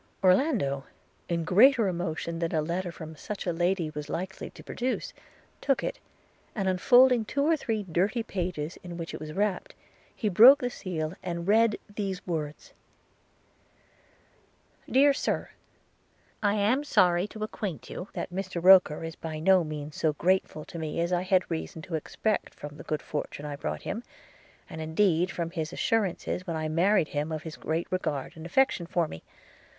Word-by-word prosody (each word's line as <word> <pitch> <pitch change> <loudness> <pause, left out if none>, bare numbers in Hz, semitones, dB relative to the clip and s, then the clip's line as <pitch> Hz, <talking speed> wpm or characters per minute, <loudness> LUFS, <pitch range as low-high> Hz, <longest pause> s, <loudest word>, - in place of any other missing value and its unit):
Orlando, 185 - +2 0.4
in 170 -1 0
greater 225 +7 +5
emotion 170 -2 -3
than 165 -1 -1
a 155 - +2
letter 175 +3 -2
from 160 -1 -9
such 205 +6 -6
a 175 - 0
lady 175 -1 0
was 150 -1 -6
likely 185 +4 -4
to - - -14
produce, 255 +1 -3 0.5
took 275 - +1
it, - - -3 0.6
and 195 -4 -1
unfolding 245 +6 +5
two 280 +6 -1
or 325 +1 +4
three 225 -8 -2
dirty 190 +6 0
papers 175 -5 -4
in 175 -1 -8
which 165 -1 -6
it - - -5
was 155 0 -7
wrapped, 210 - -1 0.4
he 220 - -2
broke 230 +8 +9
the 245 -2 -3
seal, 165 -7 -4
and 170 -1 -4
read 220 +1 +4
these 200 -2 -4
words: 155 -4 -4 2.2
'DEAR 280 +2 +5
SIR, - - -2 0.9
'I 205 -1 +2
AM 220 +7 +2
sorry 180 -8 +3
to 215 0 -7
acquaint 200 -6 -5
you 180 - -6
that - - -5
Mr 185 -1 -3
Roker 180 -5 +7
is 165 0 -5
by 160 -1 -6
no 185 +2 +5
means 150 -1 -6
so 155 -2 +1
grateful 170 -1 0
to 170 - -8
me 160 0 -3
as 170 +2 0
I 175 - +2
had 185 0 +3
reason 160 0 -4
to 175 - -9
expect 200 +6 -2
from 145 0 -9
the - - -9
good 155 -5 -3
fortune 150 0 -5
I 145 -1 -4
brought 140 - -4
him, 225 +4 -4 0.6
and 160 - -7
indeed 170 +2 +2
from 170 -3 -3
his 160 -2 -3
assurances 190 -4 -1
when 165 - -2
I 155 0 -2
married 175 +1 +3
him 150 +2 -2
of 155 -1 -4
his 160 -2 -7
great 160 +2 -2
regard 150 -7 -2
and 160 +1 -8
affection 185 -4 +2
for 170 -2 +1
me. 80 - -9
180 Hz, 175 wpm, -28 LUFS, 160-205 Hz, 2.2 s, broke